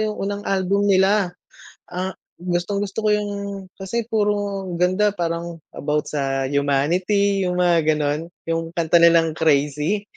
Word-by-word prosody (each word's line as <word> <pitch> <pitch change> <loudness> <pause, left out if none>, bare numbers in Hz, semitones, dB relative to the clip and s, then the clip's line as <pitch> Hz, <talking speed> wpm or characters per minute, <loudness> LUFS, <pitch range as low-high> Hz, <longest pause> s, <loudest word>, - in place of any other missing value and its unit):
yung 215 -1 -1
unang 200 +1 -3
album 195 +1 +1
nila 195 0 +3 0.6
ang 185 +2 -3 0.2
gustong 180 +3 -2
gusto 205 +2 -3
ko - - +4
yung 210 -1 -2 0.5
kasi 225 +5 -2
puro 205 -3 -1
ganda 185 +4 +2
parang 170 -1 -3 0.2
about 150 +1 -2
sa 135 -2 -1
humanity 180 +8 +1
yung 180 - -1
mga 170 -3 +3
gano'n, 150 +2 -1 0.2
yung 165 0 -1
kanta 170 0 +3
nilang 165 -1 +5
"Crazy," 150 +5 +1
180 Hz, 135 wpm, -22 LUFS, 160-200 Hz, 0.6 s, nilang